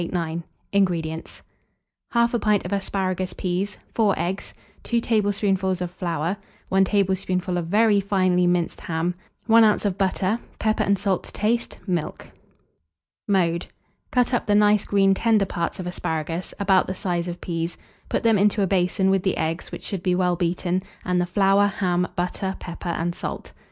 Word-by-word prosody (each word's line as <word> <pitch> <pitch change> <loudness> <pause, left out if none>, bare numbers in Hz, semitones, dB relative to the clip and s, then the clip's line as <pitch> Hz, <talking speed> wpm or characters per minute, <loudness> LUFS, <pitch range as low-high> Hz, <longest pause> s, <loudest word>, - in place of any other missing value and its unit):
INGREDIENTS. 165 -5 -1 0.7
1/2 235 0 +3
pint 210 -2 +2
of - - -3
asparagus 185 -2 -1
peas, 185 +3 -2 0.2
4 210 -4 +3
eggs, 185 +3 -3 0.3
2 235 - 0
tablespoonfuls 200 -4 +1
of 180 -1 -3
flour, 170 -1 -2 0.3
1 190 0 +4
tablespoonful 190 -2 0
of 175 -2 -2
very 210 +2 +4
finely 185 -2 +2
minced 175 -1 0
ham, 165 +2 -1 0.3
1 225 0 +6
oz. 215 -1 +3
of 195 -2 -1
butter, 195 +3 +1 0.2
pepper 215 0 +1
and 200 0 +2
salt 190 -1 -1
to - - -12
taste, 230 +3 -1
milk. 175 -5 -3 1.0
Mode. 175 -4 +1 0.4
Cut 250 0 +1
up 245 - 0
the 205 - +3
nice 210 0 +4
green 195 -1 +4
tender 215 0 +3
parts 170 0 -3
of 185 - -4
asparagus, 165 -1 -3
about 195 -2 +3
the 185 - -3
size 175 -2 -2
of 175 0 -5
peas; 165 0 -3 0.3
put - - -1
them 225 -3 +4
into 205 0 +3
a - - +3
basin 190 +1 +2
with 195 -1 +2
the 190 0 0
eggs, 160 +2 -2
which - - -7
should 195 -4 -4
be 180 -1 +1
well 180 -1 +2
beaten, 175 +1 0 0.2
and 180 -1 +1
the 175 - -1
flour, 195 +2 +4
ham, 180 -3 0
butter, 190 +2 -2
pepper, 175 0 -6
and 170 0 -1
salt. - - -6
190 Hz, 165 wpm, -24 LUFS, 175-205 Hz, 1.0 s, 1